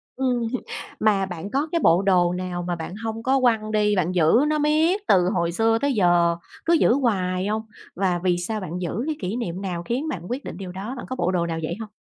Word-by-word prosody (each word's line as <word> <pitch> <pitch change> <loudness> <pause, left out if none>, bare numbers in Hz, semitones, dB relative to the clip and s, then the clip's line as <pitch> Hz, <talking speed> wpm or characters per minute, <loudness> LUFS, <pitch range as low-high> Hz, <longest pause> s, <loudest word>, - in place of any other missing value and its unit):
Ừm 250 -3 0
hừm, 255 - -2 0.4
mà 205 -3 +3
bạn 185 +1 -6
có 280 +3 0
cái 335 -2 +1
bộ 170 +3 +5
đồ 180 -3 +3
nào 180 -1 -3
mà 175 0 -2
bạn 170 +2 -6
hông 225 +1 -5
có 265 +2 +3
quăng 225 -4 +2
đi, 210 -1 +2
bạn 180 -2 +1
giữ 160 -2 +4
nó 305 0 +1
miết 315 +6 +2
từ 180 -1 +4
hồi 170 -4 0
xưa 225 +5 +2
tới 285 -1 +1
giờ, 175 -5 +3 0.3
cứ 335 - +3
giữ 320 - +4
hoài 190 -8 0
không? 220 +1 0 0.3
Và 180 -2 0
vì 180 -2 +2
sao 215 +5 -3
bạn 180 -1 -5
giữ, 180 +6 -2
cái 315 0 -2
kỷ 190 +3 -2
niệm 190 -7 -4
nào 180 -3 -3
khiến 250 - -2
bạn 195 - -4
quyết 255 +4 -3
định - - -7
điều 185 -2 -6
đó, 195 +7 -6
bạn 245 - -6
có 255 - -3
bộ 180 -7 0
đồ 175 -2 0
nào 165 -1 -3
vậy 155 - -2
hông? 220 -1 -6
195 Hz, 250 wpm, -23 LUFS, 180-245 Hz, 0.4 s, bộ